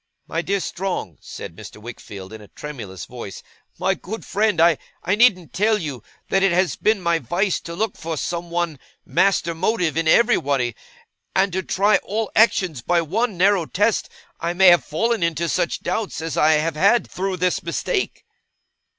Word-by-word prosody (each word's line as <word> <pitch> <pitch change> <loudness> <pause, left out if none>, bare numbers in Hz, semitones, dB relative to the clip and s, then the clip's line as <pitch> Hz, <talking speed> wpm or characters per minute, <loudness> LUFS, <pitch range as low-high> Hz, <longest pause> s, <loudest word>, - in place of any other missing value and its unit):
'My 165 - -1
dear 200 +3 0
Strong,' 180 - -4
said 85 - -8
Mr. 105 +1 -11
Wickfield 105 -3 -9
in 110 - -9
a 105 - -13
tremulous 105 - -8
voice, 120 -5 -9 0.3
'my - - +1
good 220 +5 -7
friend, 210 -3 +1
I 165 -2 +5 0.3
needn't 200 -3 +3
tell 215 +2 +2
you 145 - -5 0.3
that 195 - +2
it 195 -1 +4
has 180 +1 +2
been 215 -1 +2
my 170 -1 +2
vice 175 - 0
to 170 - -8
look 215 +2 -1
for 165 -1 -5
some 170 +3 -3
one 170 -4 -2 0.3
master 170 +2 +2
motive 175 -2 0
in 165 0 0
everybody, 140 - +3 0.6
and 190 -1 +2
to 190 - 0
try 200 +3 +3
all 215 +1 -3
actions 185 - +3
by 175 +6 +2
one 210 +5 -1
narrow 185 -2 +3
test. 210 +4 +1 0.3
I 170 +1 -1
may 190 +1 +7
have 175 -6 +5
fallen 225 - 0
into 170 0 0
such 170 - -1
doubts 200 +3 -2
as 160 0 -4
I 155 +1 +4
have 155 +1 +1
had, 200 +9 +4
through 190 0 -3
this 180 0 0
mistake. 170 - -2
175 Hz, 175 wpm, -22 LUFS, 155-195 Hz, 0.6 s, may